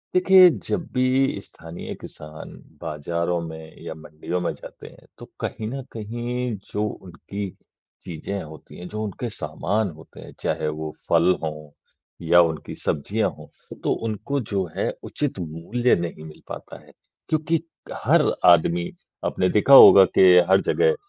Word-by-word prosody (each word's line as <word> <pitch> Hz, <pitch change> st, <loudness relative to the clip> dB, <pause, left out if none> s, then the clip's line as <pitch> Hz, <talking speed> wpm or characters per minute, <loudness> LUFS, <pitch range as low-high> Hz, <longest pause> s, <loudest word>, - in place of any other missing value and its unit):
देखिए, 185 Hz, 0 st, +7 dB
जब 170 Hz, 0 st, -3 dB
भी 130 Hz, -3 st, +1 dB
स्थानीय 80 Hz, +1 st, -9 dB
किसान 75 Hz, 0 st, -10 dB, 0.3 s
बाज़ारों 85 Hz, +3 st, -2 dB
में 80 Hz, 0 st, -11 dB
या -, -, -5 dB
मंडियों 80 Hz, +3 st, -5 dB
में 90 Hz, -, -1 dB
जाते -, -, -12 dB
हैं, -, -, -17 dB
तो -, -, -10 dB, 0.2 s
कहीं 110 Hz, -, -4 dB
न 135 Hz, +3 st, -5 dB
कहीं 120 Hz, +2 st, -4 dB, 0.2 s
जो 105 Hz, -, -1 dB
उनकी 95 Hz, +1 st, -7 dB, 0.5 s
चीज़ें 95 Hz, +3 st, -5 dB
होती 80 Hz, -1 st, -13 dB
हैं, 90 Hz, -, -8 dB
जो 105 Hz, 0 st, -5 dB
उनके 110 Hz, +3 st, -4 dB
सामान 105 Hz, 0 st, -2 dB
होते 80 Hz, -, -15 dB
हैं, -, -, -11 dB
चाहे 75 Hz, -, -1 dB
वो 75 Hz, 0 st, -4 dB, 0.2 s
फल 85 Hz, +2 st, +4 dB
हों 75 Hz, -1 st, -6 dB, 0.6 s
या 85 Hz, +1 st, +7 dB
उनकी 80 Hz, -3 st, -2 dB
सब्जियाँ 100 Hz, +9 st, -1 dB
हों, -, -, -12 dB, 0.4 s
तो -, -, +2 dB
उनको 115 Hz, +6 st, -3 dB
जो 95 Hz, -2 st, +1 dB
है -, -, 0 dB
उचित 145 Hz, -9 st, -3 dB
मूल्य 85 Hz, +10 st, 0 dB
नहीं 85 Hz, -2 st, -5 dB
मिल 75 Hz, -, -13 dB
पाता -, -, -9 dB
है -, -, -18 dB, 0.4 s
क्योंकि 155 Hz, +1 st, +1 dB, 0.3 s
क -, -, -6 dB
हर -, -, +4 dB, 0.2 s
आदमी 85 Hz, 0 st, +4 dB, 0.4 s
आपने 90 Hz, -, +1 dB
देखा 110 Hz, +6 st, +3 dB
होगा 100 Hz, -7 st, +11 dB
कि -, -, +7 dB, 0.3 s
हर 95 Hz, 0 st, +5 dB
जगह 470 Hz, 0 st, +2 dB
95 Hz, 155 wpm, -23 LUFS, 80-120 Hz, 0.6 s, होगा